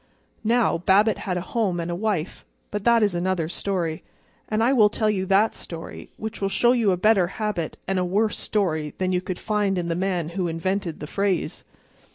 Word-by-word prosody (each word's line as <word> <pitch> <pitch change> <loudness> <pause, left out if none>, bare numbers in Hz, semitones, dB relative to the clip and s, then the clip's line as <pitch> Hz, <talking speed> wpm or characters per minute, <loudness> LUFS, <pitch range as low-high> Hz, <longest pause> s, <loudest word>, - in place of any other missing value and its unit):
Now, 230 -4 +2
Babbitt 205 +4 +3
had 180 - 0
a - - -2
home 200 -7 +1
and 170 +1 -3
a - - -2
wife—but 205 +1 -4
that 235 -1 +5
is 205 -3 +2
another 175 -2 0
story. 175 -2 -2 0.5
And 215 +1 +1
I 250 +4 +4
will 215 -5 +6
tell 215 0 +1
you 190 -2 -2
that 200 +3 +3
story, 165 -1 -8
which 220 0 -6
will 195 - +1
show 240 +5 +3
you 235 -5 +3
a 180 - +1
better 195 -1 +4
habit 200 -4 -3
and 190 0 +1
a - - +1
worse 205 +4 0
story 160 -8 -1
than 185 0 0
you 180 -1 +1
could 185 -1 -4
find 205 -3 0
in 170 -1 -2
the 165 - 0
man 180 -3 -1
who 180 +1 -2
invented 170 +1 -2
the - - -4
phrase. 195 +2 -1
195 Hz, 205 wpm, -24 LUFS, 175-215 Hz, 0.5 s, will